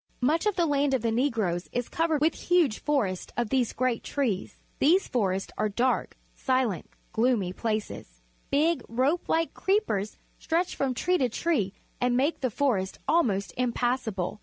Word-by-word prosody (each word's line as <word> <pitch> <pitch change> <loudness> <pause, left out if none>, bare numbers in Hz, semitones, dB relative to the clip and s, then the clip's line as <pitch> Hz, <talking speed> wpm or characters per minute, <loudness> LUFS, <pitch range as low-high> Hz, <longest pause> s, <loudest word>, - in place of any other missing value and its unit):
Much 315 +10 +2
of 415 - +1
the 345 - +2
land 285 -2 +2
of 245 - -2
the 230 - +1
Negroes 225 -8 0
is 245 -1 -2
covered 320 -2 0
with 315 +1 +3
huge 340 -11 +2
forests 215 -12 -1
of 240 -3 -1
these 255 -3 +2
great 255 -2 -1
trees. 240 -10 -2 0.2
These 350 +7 +4
forests 195 -5 -1
are 215 - +1
dark, 245 +5 0 0.2
silent, 255 -8 0 0.2
gloomy 220 -6 +1
places. 215 - -4 0.3
Big, 305 0 +2
rope 265 +9 0
like 330 0 +1
creepers 380 - 0 0.2
stretch 340 +2 0
from 265 -2 -1
tree 360 +8 +1
to 255 -3 +2
tree 225 - 0 0.3
and 245 0 +2
make 285 +6 +1
the 255 - +1
forest 215 -6 0
almost 215 - +1
impassable. 240 -5 -1
255 Hz, 160 wpm, -27 LUFS, 215-295 Hz, 0.3 s, These